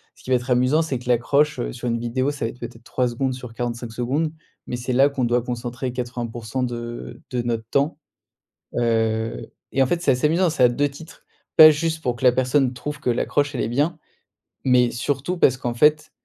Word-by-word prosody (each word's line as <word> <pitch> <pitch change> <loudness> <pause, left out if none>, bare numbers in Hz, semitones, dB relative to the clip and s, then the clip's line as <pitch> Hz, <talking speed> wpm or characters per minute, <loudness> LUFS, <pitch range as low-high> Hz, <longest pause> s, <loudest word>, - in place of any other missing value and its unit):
ce - - -20
qui - - -10
va 130 - +4
être 120 +2 -8
amusant, 125 +6 +3
c'est 140 -6 -2
que 125 0 -9
l'accroche, 140 +5 +2
heu, - - -3
sur 125 - -5
une 115 0 0
vidéo, 130 +4 -1
ça 140 -5 -4
va - - -1
être 125 - -12
peut-être 120 -1 -9
3 125 -1 0
secondes 130 +2 -1
sur 125 -2 -9
45 120 0 -4
secondes, 135 +7 -1 0.3
mais - - -4
c'est 125 +1 -3
là 135 +3 +5
qu'on 135 -3 -1
doit 120 +1 +2
concentrer 125 +1 -4
80% 120 0 -4
de 120 - -6
de 125 - 0
notre 115 -2 -2
temps. 145 +3 +1 0.8
Heu, 115 -1 0 0.2
et 135 - +3
en - - +3
fait, 175 +4 -1
c'est 145 - +3
assez 125 +4 +1
amusant, 170 +3 +2
c'est 150 -5 +2
à 125 - +7
2 145 +4 +1
titres. 155 +4 -13 0.3
Pas 155 -1 +11
juste 160 +1 -1
pour 125 -4 -1
que 120 - -7
la 125 - +7
personne 130 +1 +2
trouve 145 +4 -6
que 135 - -3
l'accroche 145 +4 0
elle 125 - -2
est - - -1
bien, 150 +7 0 0.7
mais 125 -2 +4
surtout 140 +8 -2
parce 130 -6 +4
qu'en 120 -2 -3
fait, 150 +4 +3
125 Hz, 220 wpm, -22 LUFS, 120-145 Hz, 0.8 s, Pas